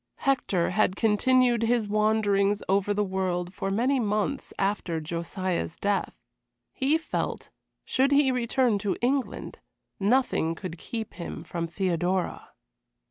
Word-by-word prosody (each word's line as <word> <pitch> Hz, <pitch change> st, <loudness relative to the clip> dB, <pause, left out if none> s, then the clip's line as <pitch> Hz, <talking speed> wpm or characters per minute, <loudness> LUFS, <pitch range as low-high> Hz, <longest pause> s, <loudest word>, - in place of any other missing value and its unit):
Hector 245 Hz, -11 st, +1 dB
had 190 Hz, -1 st, +2 dB
continued 240 Hz, +3 st, +3 dB
his 230 Hz, -1 st, +1 dB
wanderings 210 Hz, -1 st, +2 dB
over 195 Hz, +1 st, +2 dB
the 205 Hz, 0 st, +1 dB
world 185 Hz, -2 st, -2 dB
for 195 Hz, 0 st, -3 dB
many 250 Hz, +7 st, +2 dB
months 215 Hz, +5 st, -1 dB
after 195 Hz, -4 st, -1 dB
Josiah's 170 Hz, +2 st, -3 dB
death. 200 Hz, -1 st, -1 dB, 0.6 s
He 285 Hz, +4 st, +2 dB
felt, 325 Hz, -, -4 dB, 0.3 s
should 270 Hz, +2 st, +2 dB
he 280 Hz, -2 st, +5 dB
return 245 Hz, -2 st, +1 dB
to 200 Hz, -1 st, -1 dB
England, 265 Hz, +1 st, -1 dB, 0.4 s
nothing 200 Hz, -6 st, +2 dB
could 175 Hz, -1 st, -7 dB
keep 225 Hz, -3 st, -5 dB
him 170 Hz, 0 st, -6 dB
from 170 Hz, -1 st, -4 dB
Theodora. 180 Hz, 0 st, -1 dB
205 Hz, 125 wpm, -27 LUFS, 185-245 Hz, 0.6 s, he